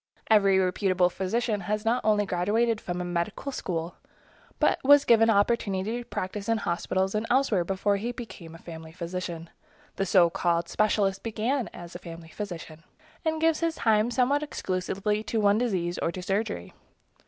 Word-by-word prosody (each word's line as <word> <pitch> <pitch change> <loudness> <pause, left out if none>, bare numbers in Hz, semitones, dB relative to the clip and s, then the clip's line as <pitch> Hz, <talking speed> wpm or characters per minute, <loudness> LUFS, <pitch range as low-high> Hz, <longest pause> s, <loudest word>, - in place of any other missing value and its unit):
Every 200 -3 +5
reputable 185 -1 +2
physician 210 +4 -1
has 210 +3 -3
not 235 +2 +1
only 210 -1 +3
graduated 210 +5 +1
from 175 0 -4
a - - -3
medical 175 +10 -3
school, 170 -7 -4 0.6
but - - +3
was 285 +1 +7
given 225 -1 +5
opportunity 205 0 +1
to 240 - -8
practice 205 0 -4
in 225 - +3
hospitals 190 0 -1
and 215 +1 -1
elsewhere 245 -8 +2
before 195 +3 0
he 230 +5 -3
became 200 -9 -9
a - - -9
family 160 -1 -10
physician. 170 -1 -5 0.5
The 195 - 0
so 175 -2 +5
called 170 0 0
specialist 200 -2 +1
began 230 +3 -1
as 175 0 -10
a - - -7
family 165 -1 -10
physician, 165 -5 -7 0.4
and 320 -1 0
gives 325 0 +2
his 330 -1 0
time 220 0 +2
somewhat 260 +4 +2
exclusively 200 -5 -2
to 225 - -1
one 205 0 +4
disease 185 -7 -1
or 165 - 0
to 185 - -6
surgery. 195 - -2
200 Hz, 165 wpm, -27 LUFS, 180-225 Hz, 0.6 s, was